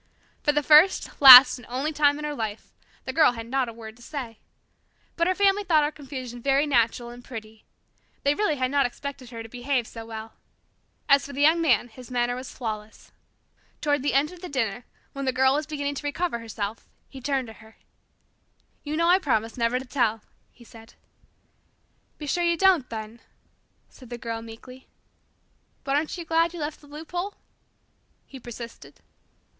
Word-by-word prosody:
For 295 Hz, -, +2 dB
the 295 Hz, 0 st, 0 dB
first, 310 Hz, +5 st, +4 dB
last, 255 Hz, -1 st, +11 dB
and 245 Hz, -, -15 dB
only 270 Hz, +6 st, -2 dB
time 290 Hz, -1 st, +3 dB
in 300 Hz, -, -5 dB
her 300 Hz, -, -3 dB
life, 220 Hz, -5 st, -6 dB, 0.3 s
the -, -, -4 dB
Girl 310 Hz, -6 st, +4 dB
had 230 Hz, -1 st, -7 dB
not 255 Hz, +1 st, -1 dB
a -, -, -9 dB
word 220 Hz, -1 st, -11 dB
to -, -, -19 dB
say. 240 Hz, -4 st, -7 dB, 0.8 s
But 335 Hz, 0 st, +1 dB
her 370 Hz, -, +1 dB
family 405 Hz, +1 st, +2 dB
thought 315 Hz, -5 st, +3 dB
her 295 Hz, -, -1 dB
confusion 255 Hz, -5 st, -8 dB
very 275 Hz, +3 st, +2 dB
natural 240 Hz, -3 st, 0 dB
and 245 Hz, 0 st, -12 dB
pretty. 220 Hz, -3 st, -10 dB, 0.6 s
They 280 Hz, -, +3 dB
really 320 Hz, -2 st, 0 dB
had 255 Hz, -1 st, -1 dB
not 280 Hz, -2 st, +2 dB
expected 270 Hz, 0 st, -8 dB
her 230 Hz, -2 st, -8 dB
to -, -, -10 dB
behave 245 Hz, +1 st, -2 dB
so 225 Hz, 0 st, -9 dB
well. 220 Hz, 0 st, -8 dB, 0.7 s
As 280 Hz, -2 st, +5 dB
for 280 Hz, -, -9 dB
the 280 Hz, -, -3 dB
Young 325 Hz, +3 st, +4 dB
Man, 250 Hz, -7 st, +2 dB
his 245 Hz, +1 st, -14 dB
manner 245 Hz, -1 st, -1 dB
was 255 Hz, +1 st, -8 dB
flawless. 215 Hz, -3 st, -7 dB, 0.7 s
Toward 290 Hz, -2 st, 0 dB
the 285 Hz, 0 st, -1 dB
end 290 Hz, +4 st, +2 dB
of 360 Hz, -1 st, -13 dB
the 360 Hz, -, -7 dB
dinner, 240 Hz, -4 st, -2 dB, 0.3 s
when 275 Hz, 0 st, -5 dB
the 260 Hz, -, +1 dB
Girl 265 Hz, +1 st, +3 dB
was 300 Hz, +1 st, -2 dB
beginning 285 Hz, -2 st, -3 dB
to 290 Hz, +1 st, -5 dB
recover 290 Hz, -3 st, -2 dB
herself, 220 Hz, -1 st, -6 dB, 0.2 s
he 265 Hz, -, -12 dB
turned 270 Hz, 0 st, -1 dB
to 225 Hz, -, -11 dB
her. 220 Hz, 0 st, -18 dB, 1.1 s
"You 300 Hz, +1 st, -4 dB
know 335 Hz, +1 st, +2 dB
I 360 Hz, +2 st, +5 dB
promised 230 Hz, -, -1 dB
never 235 Hz, 0 st, 0 dB
to 260 Hz, -, -6 dB
tell," 230 Hz, -4 st, -1 dB, 0.3 s
he 240 Hz, -, -19 dB
said. 225 Hz, -1 st, -16 dB, 1.2 s
"Be 300 Hz, -, -8 dB
sure 350 Hz, +5 st, -1 dB
you 340 Hz, 0 st, +1 dB
don't, 360 Hz, -8 st, +3 dB
then," 220 Hz, +1 st, -7 dB, 0.7 s
said 255 Hz, -3 st, -16 dB
the 240 Hz, -, -6 dB
Girl 230 Hz, -1 st, -5 dB
meekly. 235 Hz, +3 st, -13 dB, 1.0 s
"But 275 Hz, -1 st, -1 dB
aren't 305 Hz, +4 st, -1 dB
you 340 Hz, -, -7 dB
glad 330 Hz, +1 st, +1 dB
you -, -, -7 dB
left 300 Hz, 0 st, -5 dB
the 295 Hz, -, -17 dB
loophole?" 350 Hz, +6 st, -6 dB, 0.9 s
he 270 Hz, -, -12 dB
persisted. 235 Hz, -1 st, -10 dB
265 Hz, 190 wpm, -25 LUFS, 235-300 Hz, 1.2 s, last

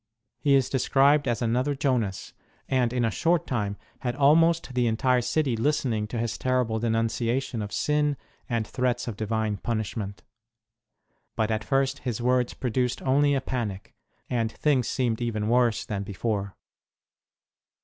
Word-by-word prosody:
He 140 Hz, -2 st, +3 dB
is 135 Hz, -2 st, +3 dB
described 140 Hz, +2 st, +3 dB
as 120 Hz, -1 st, 0 dB
another 125 Hz, +5 st, +1 dB
Jonas, 125 Hz, -9 st, -1 dB, 0.3 s
and 125 Hz, -3 st, +1 dB
in 125 Hz, -1 st, +1 dB
a 115 Hz, -, +1 dB
short 170 Hz, +5 st, +1 dB
time 105 Hz, -5 st, -2 dB, 0.2 s
had 120 Hz, -1 st, -2 dB
almost 160 Hz, +1 st, +4 dB
the 125 Hz, -1 st, +2 dB
entire 125 Hz, +3 st, +2 dB
city 135 Hz, 0 st, 0 dB
listening 120 Hz, -4 st, 0 dB
to 120 Hz, -, -5 dB
his 115 Hz, 0 st, -2 dB
terrible 125 Hz, -3 st, 0 dB
denunciation 115 Hz, +2 st, -1 dB
of 105 Hz, -1 st, -5 dB
sin 150 Hz, -1 st, +1 dB, 0.3 s
and 115 Hz, -3 st, 0 dB
threats 125 Hz, +1 st, -1 dB
of 115 Hz, -, -3 dB
Divine 110 Hz, -1 st, -1 dB
punishment. 110 Hz, -2 st, -4 dB, 1.1 s
But 110 Hz, 0 st, 0 dB
at 110 Hz, -1 st, -1 dB
first 135 Hz, +4 st, 0 dB
his 120 Hz, -4 st, -3 dB
words 125 Hz, 0 st, +1 dB
produced 125 Hz, 0 st, -1 dB
only 140 Hz, +2 st, +3 dB
a 135 Hz, -, 0 dB
panic, 110 Hz, -8 st, -4 dB, 0.3 s
and 115 Hz, -2 st, -1 dB
things 135 Hz, -3 st, +1 dB
seemed 120 Hz, -3 st, -1 dB
even 110 Hz, -3 st, -1 dB
worse 120 Hz, -2 st, +2 dB
than 100 Hz, -2 st, -3 dB
before. 100 Hz, 0 st, -3 dB
120 Hz, 150 wpm, -26 LUFS, 110-135 Hz, 1.1 s, almost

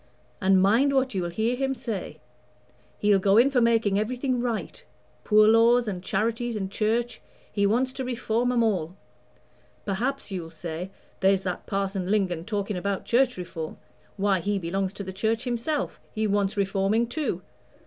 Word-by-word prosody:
And 190 Hz, 0 st, +4 dB
mind 230 Hz, +9 st, +4 dB
what 265 Hz, -2 st, +1 dB
you'll 180 Hz, -3 st, -1 dB
hear 220 Hz, +7 st, 0 dB
him 270 Hz, +1 st, -1 dB
say; 215 Hz, -10 st, -5 dB, 0.8 s
he'll 205 Hz, -1 st, +3 dB
go 195 Hz, +2 st, +3 dB
in 255 Hz, +4 st, +5 dB
for 250 Hz, -3 st, +3 dB
making 225 Hz, -4 st, +3 dB
everything 250 Hz, +3 st, -1 dB
right 235 Hz, -3 st, -3 dB, 0.4 s
Poor 215 Hz, 0 st, +5 dB
laws 230 Hz, +2 st, +5 dB
and 185 Hz, -4 st, -3 dB
Charities 230 Hz, +4 st, -1 dB
and 195 Hz, -2 st, -3 dB
Church 230 Hz, +3 st, -1 dB, 0.3 s
he 200 Hz, -1 st, +2 dB
wants 255 Hz, +5 st, +1 dB
to 265 Hz, -, -4 dB
reform 240 Hz, -1 st, 0 dB
'em 240 Hz, -2 st, +2 dB
all. 185 Hz, -6 st, 0 dB, 0.9 s
Perhaps 235 Hz, +5 st, -2 dB
you'll 175 Hz, -4 st, -4 dB
say, 165 Hz, +2 st, -6 dB, 0.3 s
'There's 195 Hz, 0 st, +3 dB
that 180 Hz, -1 st, -4 dB
Parson 195 Hz, -2 st, -2 dB
Lingon 185 Hz, -5 st, 0 dB
talking 205 Hz, -2 st, -2 dB
about 200 Hz, +1 st, -2 dB
Church 250 Hz, -1 st, +2 dB
Reform 165 Hz, -3 st, -6 dB, 0.4 s
why, 195 Hz, -1 st, +2 dB
he 205 Hz, +3 st, -1 dB
belongs 190 Hz, +2 st, -2 dB
to 200 Hz, -, -6 dB
the 190 Hz, -1 st, -6 dB
Church 220 Hz, +4 st, 0 dB
himself 255 Hz, +4 st, -2 dB
he 220 Hz, 0 st, -1 dB
wants 205 Hz, -1 st, 0 dB
reforming 200 Hz, +3 st, +1 dB
too.' 285 Hz, +6 st, -3 dB
210 Hz, 160 wpm, -26 LUFS, 195-240 Hz, 0.9 s, in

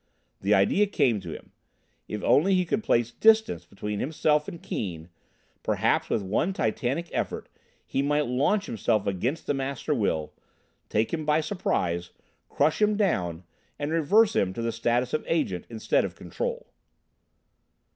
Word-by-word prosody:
The 100 Hz, +2 st, +3 dB
idea 100 Hz, -, +3 dB
came 120 Hz, -, +2 dB
to 90 Hz, -3 st, -9 dB
him: -, -, -10 dB, 0.6 s
if 105 Hz, -, -5 dB
only 190 Hz, +6 st, +4 dB
he 180 Hz, -1 st, +2 dB
could 210 Hz, +6 st, -1 dB
place 120 Hz, -, +2 dB
distance 220 Hz, -, +3 dB
between 105 Hz, +2 st, -5 dB
himself 150 Hz, +1 st, +1 dB
and 170 Hz, -, -7 dB
Keane, 85 Hz, -, -5 dB, 0.5 s
perhaps -, -, +1 dB
with 105 Hz, -, 0 dB
one 110 Hz, -, 0 dB
titanic 130 Hz, -, -1 dB
effort -, -, -3 dB, 0.4 s
he 135 Hz, -, -1 dB
might 145 Hz, +1 st, +1 dB
launch 140 Hz, -, +1 dB
himself 110 Hz, -1 st, 0 dB
against 115 Hz, -, -2 dB
the -, -, 0 dB
Master 140 Hz, +2 st, -2 dB
Will, 90 Hz, -, -1 dB, 0.6 s
take 110 Hz, +6 st, 0 dB
him 160 Hz, -2 st, -1 dB
by 150 Hz, +1 st, +3 dB
surprise, 90 Hz, -, -1 dB, 0.4 s
crush 155 Hz, +7 st, +1 dB
him 210 Hz, 0 st, +3 dB
down, 90 Hz, -, 0 dB, 0.3 s
and 145 Hz, +1 st, -3 dB
reverse 200 Hz, +8 st, +4 dB
him 95 Hz, -1 st, +1 dB
to 115 Hz, -, -3 dB
the 115 Hz, -, 0 dB
status 120 Hz, +2 st, 0 dB
of 155 Hz, -, 0 dB
Agent 145 Hz, -, -1 dB
instead 115 Hz, -2 st, +1 dB
of -, -, -4 dB
Control. -, -, -4 dB
135 Hz, 155 wpm, -27 LUFS, 105-165 Hz, 0.6 s, only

